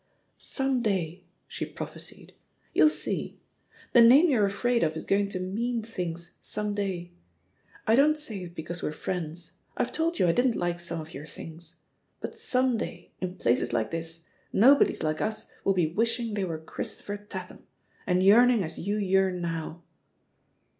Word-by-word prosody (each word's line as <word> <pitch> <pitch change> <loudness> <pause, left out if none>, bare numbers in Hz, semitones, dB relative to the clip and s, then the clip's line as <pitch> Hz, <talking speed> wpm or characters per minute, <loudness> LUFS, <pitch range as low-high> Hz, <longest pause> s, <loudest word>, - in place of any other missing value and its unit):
"Some 270 -2 0
day!" 185 -5 -1 0.2
she - - -5
prophesied. - - -8 0.4
"You'll 310 - +6
seel - - -3 0.6
The 240 - +8
name 275 +8 +7
you're 215 -6 +4
afraid 235 +4 +1
of 160 -1 +1
is - - -6
going 200 0 +2
to 195 -2 -3
'mean 225 +6 -2
things' 175 -6 -6
some 210 0 -3
day. 190 -4 -3 0.7
I 220 - +3
don't 295 +5 +5
say 225 -10 -7
it 170 0 -11
because 170 +2 -5
we're 150 - -2
friends 170 0 -5
— - - -38
I've - - 0
told 335 +2 0
you - - +3
I - - +5
didn't 245 +4 +2
like 175 -1 -1
some 170 -1 -4
of 155 +1 -11
your 145 +3 -8
things. 165 0 -11 0.4
But - - -6
some 255 -2 +1
day, - - -6
in 185 -1 -3
places 120 -4 +1
like 110 -2 0
this, 165 0 -6 0.3
no 245 +8 +7
bodies - - +1
like 155 0 0
us 215 0 -3
will 195 - +3
be 165 -3 +1
wishing 230 +2 0
they 200 -2 0
were 165 -3 -3
Chris 160 0 -5
topher 205 0 -7
Tatham, - - -8 0.4
and 180 0 +3
yearning 230 +2 +6
as 160 -1 -6
you 205 +4 -1
yearn 190 -2 +2
now." 165 0 -4
190 Hz, 175 wpm, -28 LUFS, 170-230 Hz, 0.7 s, The